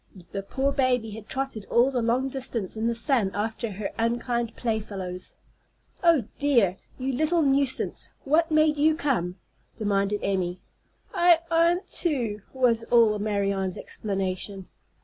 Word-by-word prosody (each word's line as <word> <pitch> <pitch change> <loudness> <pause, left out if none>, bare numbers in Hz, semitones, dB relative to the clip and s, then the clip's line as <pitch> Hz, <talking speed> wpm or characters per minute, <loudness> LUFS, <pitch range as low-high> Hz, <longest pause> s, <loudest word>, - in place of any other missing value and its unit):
The 195 - -3
poor 270 +7 -1
baby 250 -5 +1
had 215 0 -10
trotted 265 -6 -4
all 245 +3 +3
the 250 -2 0
long 240 +3 +1
distance 255 -7 -3
in 220 +1 -1
the 235 - 0
sun 235 -4 +2
after 220 +1 -3
her 200 +1 -4
unkind 235 0 -1
playfellows. 200 -6 -4 0.7
"Oh, 335 -7 +5 0.2
dear! 235 -11 +3 0.2
You 265 +1 -2
little 315 +5 +2
nuisance! 275 -1 +1
What 320 +4 +2
made 310 -1 +3
you 310 +2 +3
come?" 245 - -1 0.4
demanded 205 -1 0
Emmy. 185 -2 -1 0.5
"I 345 -1 +5
'ant 340 +3 +3
to," 240 - -1
was 245 -3 +2
all 225 -3 +4
Marianne's 200 -3 -1
explanation. 195 -1 -4
235 Hz, 135 wpm, -26 LUFS, 205-275 Hz, 0.7 s, Oh